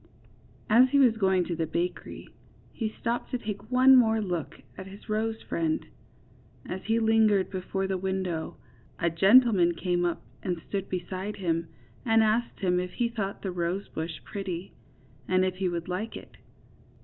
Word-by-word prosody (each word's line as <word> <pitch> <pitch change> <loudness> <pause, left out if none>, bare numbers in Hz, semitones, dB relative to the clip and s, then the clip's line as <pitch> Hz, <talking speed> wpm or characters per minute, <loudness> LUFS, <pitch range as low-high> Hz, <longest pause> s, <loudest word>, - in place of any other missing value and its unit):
As 245 +4 +6
he 280 - +2
was 250 -5 +5
going 190 -4 +2
to 170 - -3
the 165 -1 -2
bakery 175 +3 -4 0.5
he 220 -2 -2
stopped 235 +2 -3
to 250 - -1
take 210 -1 -7
one 260 +1 +7
more 225 -3 +4
look 180 -7 -4 0.2
at 190 - -8
his 195 +2 -13
rose 220 +1 -2
friend. 160 -1 -1 0.8
As 185 +1 -6
he 225 +1 +2
hngered 220 -3 +3
before 190 0 -3
the 190 -1 -2
window, 190 -3 -3 0.4
a 170 0 0
gentleman 195 -1 +5
came 175 -1 0
up 175 -1 -1 0.2
and 180 -3 -2
stood 195 -1 -3
beside 185 +3 -4
him, 165 -3 -1 0.4
and 225 -1 +4
asked 220 +2 0
him 180 -2 +2
if 180 0 -4
he 240 -1 0
thought 205 -4 -4
the 190 - -2
rosebush 170 -2 -4
pretty, 190 -2 -5 0.5
and 185 0 +3
if 185 0 -2
he 190 -1 0
would 170 -1 -4
like 185 +5 -4
it. - - -14
190 Hz, 165 wpm, -28 LUFS, 180-220 Hz, 0.8 s, one